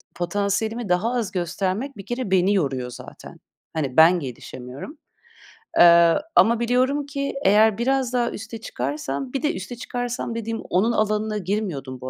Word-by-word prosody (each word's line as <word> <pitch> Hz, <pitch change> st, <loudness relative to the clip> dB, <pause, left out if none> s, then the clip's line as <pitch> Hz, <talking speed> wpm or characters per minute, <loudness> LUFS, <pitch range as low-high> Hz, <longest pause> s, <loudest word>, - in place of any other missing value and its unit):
potansiyelimi 205 Hz, +5 st, -1 dB
daha 190 Hz, +7 st, +1 dB
az 230 Hz, -6 st, -1 dB
göstermek 190 Hz, -, -2 dB
bir 195 Hz, -, -9 dB
kere 240 Hz, -5 st, -4 dB
beni 190 Hz, +2 st, +3 dB
yoruyor 135 Hz, -9 st, -1 dB
zaten. -, -, -11 dB, 0.3 s
Hani, 140 Hz, -4 st, -3 dB
ben 170 Hz, +3 st, +7 dB
gelişemiyorum. 130 Hz, -, -8 dB, 0.8 s
Eee, 170 Hz, -1 st, +7 dB, 0.2 s
ama 235 Hz, 0 st, +5 dB
biliyorum 255 Hz, +4 st, +1 dB
ki 280 Hz, -1 st, -3 dB
eğer 215 Hz, +1 st, +5 dB
biraz 255 Hz, +1 st, 0 dB
daha 240 Hz, -1 st, +1 dB
üste 220 Hz, +1 st, -8 dB
çıkarsam 140 Hz, -, -4 dB
bir 270 Hz, -, -1 dB
de 305 Hz, +3 st, +1 dB
üste 245 Hz, -, -6 dB
çıkarsam 245 Hz, -1 st, -4 dB
dediğim 225 Hz, 0 st, -4 dB
onun 205 Hz, +6 st, +1 dB
alanına 215 Hz, 0 st, 0 dB
girmiyordum 175 Hz, -, -3 dB
bu 130 Hz, -, -5 dB
210 Hz, 150 wpm, -23 LUFS, 170-240 Hz, 0.8 s, ben